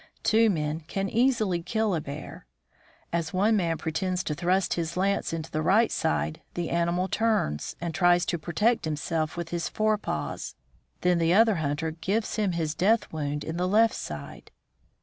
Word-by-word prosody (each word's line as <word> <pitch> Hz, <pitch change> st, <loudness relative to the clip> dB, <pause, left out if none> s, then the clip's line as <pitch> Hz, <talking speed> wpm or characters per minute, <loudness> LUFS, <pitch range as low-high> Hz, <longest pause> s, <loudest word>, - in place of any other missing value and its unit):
Two 225 Hz, +1 st, +4 dB
men 155 Hz, -4 st, -1 dB
can 195 Hz, +3 st, -2 dB
easily 225 Hz, -6 st, +2 dB
kill 220 Hz, +2 st, 0 dB
a 165 Hz, -, 0 dB
bear. 140 Hz, -, -8 dB, 0.7 s
As 165 Hz, -2 st, -1 dB
one 210 Hz, +4 st, +3 dB
man 170 Hz, -5 st, +1 dB
pretends 180 Hz, +4 st, -2 dB
to 150 Hz, -, -2 dB
thrust 180 Hz, +4 st, +1 dB
his 170 Hz, 0 st, -3 dB
lance 195 Hz, +2 st, +1 dB
into 165 Hz, -1 st, -5 dB
the 155 Hz, -, -1 dB
right 205 Hz, +8 st, +3 dB
side, 160 Hz, 0 st, -1 dB
the 175 Hz, -1 st, -2 dB
animal 170 Hz, +2 st, +1 dB
turns, 210 Hz, -, 0 dB
and 170 Hz, -1 st, -3 dB
tries 175 Hz, -1 st, +4 dB
to 170 Hz, -, -1 dB
protect 210 Hz, +9 st, +1 dB
himself 155 Hz, +1 st, -2 dB
with 170 Hz, -1 st, -4 dB
his 170 Hz, -1 st, -2 dB
fore 215 Hz, -1 st, +1 dB
paws. -, -, -4 dB, 0.5 s
Then 180 Hz, -1 st, +3 dB
the 165 Hz, +2 st, +3 dB
other 220 Hz, -2 st, +5 dB
hunter 155 Hz, +1 st, -1 dB
gives 195 Hz, +8 st, -2 dB
him 205 Hz, -4 st, +1 dB
his 160 Hz, -2 st, -1 dB
death 210 Hz, +6 st, +1 dB
wound 150 Hz, -1 st, -2 dB
in 160 Hz, +1 st, -4 dB
the 180 Hz, +1 st, 0 dB
left 220 Hz, +4 st, +4 dB
side. -, -, -7 dB
175 Hz, 175 wpm, -27 LUFS, 160-205 Hz, 0.7 s, other